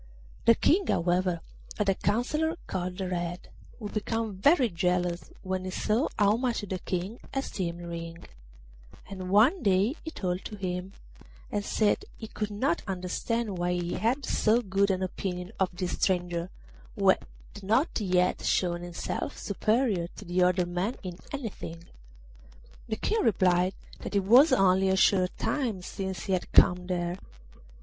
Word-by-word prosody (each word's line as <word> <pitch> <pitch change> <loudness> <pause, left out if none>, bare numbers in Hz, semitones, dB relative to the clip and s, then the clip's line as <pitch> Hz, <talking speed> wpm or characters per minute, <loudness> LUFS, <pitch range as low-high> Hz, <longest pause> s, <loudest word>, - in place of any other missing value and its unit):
The 230 0 +7
King, 365 - +3
however, 175 0 +1 0.4
had 210 - 0
a 195 - +4
counsellor 300 - 0
called 180 +1 -4
Red, 175 -1 -3 0.3
who 215 - -6
became 220 +1 -2
very 265 - +4
jealous 180 -2 -1
when 185 0 -2
he 185 - -4
saw 215 +8 +1
how 205 +1 +4
much 245 -2 -1
the 190 -2 -4
King 185 +6 -3 0.2
esteemed 180 -10 -3
Ring; 165 0 -7 0.8
and 185 -2 -6
one 230 - +5
day 200 +3 +3
he 320 - -4
talked 185 - -3
to 210 - -6
him, 185 -1 -4 0.6
and 205 - -1
said 210 0 +1
he 220 - -7
could 215 -1 -4
not 205 -4 0
understand 195 +3 -2
why 175 0 +1
he 175 0 -2
had 255 +6 0
so 230 +3 +2
good 200 0 +1
an 190 -1 0
opinion 180 0 -4
of 190 -2 +2
this 180 0 -3
stranger, 175 -2 0 0.5
who - - +3
had - - +4 0.4
not 225 - +1
yet 180 -2 +2
shown 175 -2 +1
himself 175 -1 -4
superior 215 -3 0
to 180 -2 -2
other 180 0 +3
men 180 +7 -2
in 180 -1 -6
anything. 205 - -6 1.0
The 220 - -1
King 435 - 0
replied 185 -2 +3 0.2
that - - -6
it 200 - +3
was 250 - +7
only 190 0 +4
a 190 - +3
short 185 -1 +3
time 230 -11 -1
since 190 0 -4
he 195 - 0
had 185 - -2
come 180 0 +5
there. 175 0 -2
190 Hz, 155 wpm, -28 LUFS, 180-215 Hz, 1.0 s, The